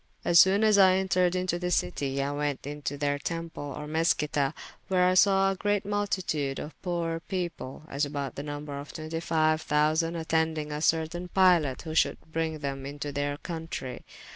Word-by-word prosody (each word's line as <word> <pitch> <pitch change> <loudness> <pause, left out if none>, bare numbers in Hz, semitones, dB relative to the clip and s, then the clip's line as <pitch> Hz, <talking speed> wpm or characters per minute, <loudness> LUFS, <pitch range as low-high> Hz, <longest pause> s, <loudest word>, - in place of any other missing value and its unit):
As 170 -1 +6
soone 195 +4 +6
as 215 -2 +5
I 190 -1 +7
entered 185 -1 +2
into 180 -1 -1
the 180 0 -2
citie, 135 - 0
I 140 - -2
went 145 -1 -2
to 145 0 -5
their 145 0 0
temple 165 -3 -5
or 150 - -6
Meschita, 150 -2 +1 0.3
where 180 -1 +3
I 185 - +3
sawe 195 0 +5
a - - -3
great 205 +1 0
multitude 185 -9 -1
of 150 - -8
poore 170 -2 -2
people, 175 -8 -4
as 140 0 -2
about 140 -2 -3
the - - -5
number 145 -1 -6
of 145 - -9
25 155 0 0
thousande, 155 +3 +1
attendyng 160 -1 0
a 150 0 -3
certayne 165 +3 0
pilot 175 -9 +3
who 160 - -5
should 160 - +2
bryng 160 0 -2
them 135 -1 -4
into 145 +1 -5
their 145 0 -2
countrey. 165 -6 -5
160 Hz, 175 wpm, -28 LUFS, 145-180 Hz, 0.3 s, I